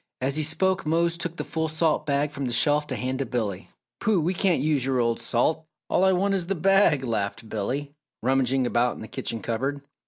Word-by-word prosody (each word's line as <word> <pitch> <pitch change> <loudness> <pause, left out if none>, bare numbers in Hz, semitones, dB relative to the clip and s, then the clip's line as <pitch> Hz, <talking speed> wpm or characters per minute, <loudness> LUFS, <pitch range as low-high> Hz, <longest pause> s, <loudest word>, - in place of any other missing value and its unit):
As 135 +2 0
he 155 - +2
spoke 190 +5 +2
Mose 170 +2 +1
took 170 0 -5
the - - -3
full 160 0 -2
salt 155 -1 0
bag 145 +1 +1
from 140 -1 -4
the 125 - -2
shelf 150 +4 +2
to 130 - -3
hand 130 +1 -3
to 135 - -1
Billy. 110 -6 -3 0.3
"Pooh! 210 -4 +2
We 170 +4 0
can't 185 -2 +2
use 150 -3 +1
your 135 0 +1
old 115 -1 0
salt 130 +7 0 0.2
all 185 - +3
I 190 - +5
want 195 +2 +1
is 180 -3 -1
the 195 - 0
bag!" 190 -5 +3
laughed 115 -1 -3
Billy, 135 +8 -3 0.3
rummaging 130 0 +2
about 120 0 +1
in - - -10
the 110 - -7
kitchen 115 0 -5
cupboard. 135 +5 -2
145 Hz, 220 wpm, -25 LUFS, 125-165 Hz, 0.3 s, I